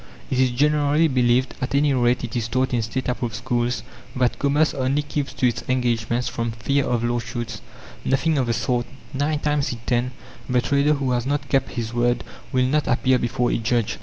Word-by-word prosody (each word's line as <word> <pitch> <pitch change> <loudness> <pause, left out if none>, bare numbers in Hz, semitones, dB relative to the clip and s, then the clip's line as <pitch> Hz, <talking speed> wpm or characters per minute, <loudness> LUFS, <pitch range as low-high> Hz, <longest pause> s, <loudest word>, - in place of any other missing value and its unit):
It 130 - +1
is 130 -1 +4
generally 150 +4 +3
believed, 125 -1 +2
at 125 +2 -1
any 145 0 +3
rate 125 -1 +2
it 120 +1 -5
is 115 -2 -1
taught 130 +3 0
in 120 - +2
State 120 +4 -3
approved 120 -2 -2
schools, 120 0 -1 0.3
that 125 -1 +1
commerce 145 +2 +2
only 135 +2 0
keeps 145 -2 -3
to 130 - +2
its 120 - -2
engagements 120 -1 0
from 115 -1 -2
fear 140 +5 0
of 120 -3 0
lawsuits. 120 0 -3 0.4
Nothing 145 +3 +1
of 130 - 0
the 115 - +1
sort; 120 0 0 0.3
nine 145 +3 0
times 150 -1 0
in 120 - -4
ten 125 +1 +1 0.4
the 125 -1 +3
trader 140 +4 +2
who 135 -2 -1
has 120 0 0
not 145 0 -1
kept 135 - +1
his 115 -1 -3
word 120 0 +1 0.3
will 130 0 +2
not 150 +3 +1
appear 130 +1 +3
before 120 +1 0
a - - 0
judge. 115 -2 0
125 Hz, 200 wpm, -23 LUFS, 120-140 Hz, 0.4 s, is